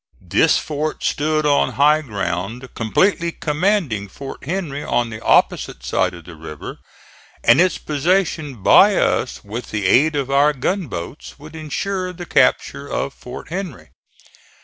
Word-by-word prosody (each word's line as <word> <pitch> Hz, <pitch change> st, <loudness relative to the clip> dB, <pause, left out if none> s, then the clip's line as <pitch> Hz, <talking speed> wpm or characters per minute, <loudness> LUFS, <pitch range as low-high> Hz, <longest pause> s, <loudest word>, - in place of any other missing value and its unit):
This 160 Hz, -, +4 dB
fort 155 Hz, 0 st, -3 dB
stood 155 Hz, +1 st, 0 dB
on 145 Hz, -1 st, +2 dB
high 150 Hz, +2 st, +4 dB
ground, 100 Hz, -, -4 dB
completely 170 Hz, -, +1 dB
commanding 150 Hz, -, 0 dB
Fort 135 Hz, +7 st, -9 dB
Henry 155 Hz, -4 st, -3 dB
on 120 Hz, -1 st, 0 dB
the 110 Hz, -, -7 dB
opposite -, -, +2 dB
side -, -, 0 dB
of 85 Hz, -, -12 dB
the 85 Hz, -, -10 dB
river, 75 Hz, -2 st, -9 dB, 0.6 s
and -, -, +6 dB
its 185 Hz, -2 st, +2 dB
possession 155 Hz, -, -1 dB
by -, -, +6 dB
us, -, -, 0 dB
with 110 Hz, +4 st, -6 dB
the 105 Hz, -2 st, -3 dB
aid 150 Hz, +11 st, +4 dB
of 135 Hz, -2 st, -2 dB
our 145 Hz, +2 st, +4 dB
gunboats, 145 Hz, -, -4 dB
would 150 Hz, +2 st, -12 dB
insure 185 Hz, +4 st, -3 dB
the 175 Hz, 0 st, -8 dB
capture 140 Hz, -3 st, +1 dB
of 140 Hz, -, -2 dB
Fort 125 Hz, -, -10 dB
Henry. 180 Hz, -6 st, -6 dB
145 Hz, 145 wpm, -20 LUFS, 115-165 Hz, 0.6 s, and